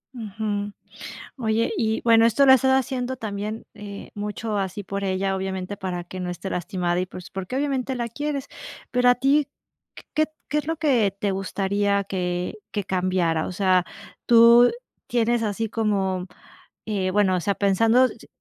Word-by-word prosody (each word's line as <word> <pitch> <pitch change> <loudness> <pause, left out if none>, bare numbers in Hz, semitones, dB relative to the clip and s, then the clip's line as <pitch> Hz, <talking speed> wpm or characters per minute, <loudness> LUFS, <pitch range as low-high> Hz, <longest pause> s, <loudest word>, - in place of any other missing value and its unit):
Ujú. 205 -2 -3 0.7
Oye, 225 - 0
y 220 0 0
bueno, 230 -1 +6
esto 235 +5 +4
lo 265 - +8
has - - +9
estado 265 +1 +3
haciendo 260 0 -3
también, 215 -1 -5
eh, 205 -2 -9
mucho 210 +1 -3
así 195 +1 -3
por 200 0 -4
ella, 195 0 0
obviamente, 190 +1 -4
para 180 -2 -4
que 185 +1 -8
no 180 - -3
esté 180 +2 -5
lastimada 180 -1 -1
y 185 - -2
pues 180 -1 -10
porque 190 +6 -5
obviamente 270 -2 -1
la 235 -2 -3
quieres, 285 +2 -3 0.4
pero 250 0 +3
a 245 - +7
ti, 275 +3 +2 0.6
¿q 310 - +3 0.2
qué 300 - 0
es 295 - -3
lo 325 +1 -1
que 255 -10 +2
te 200 -1 0
gustaría 200 +1 0
que 180 0 -3
que 205 -2 -3
cambiara? 180 -4 0
O - - -5
sea, 185 -2 +2 0.4
tú 235 +1 +7 0.4
tienes 235 -1 +1
así 220 +1 -2
como, 195 -5 0 0.6
eh, 195 -3 -1
bueno, 195 -2 +3
o 180 - -1
sea, 200 - +1
pensando 225 +6 +4
si - - -12
205 Hz, 170 wpm, -24 LUFS, 190-235 Hz, 0.7 s, has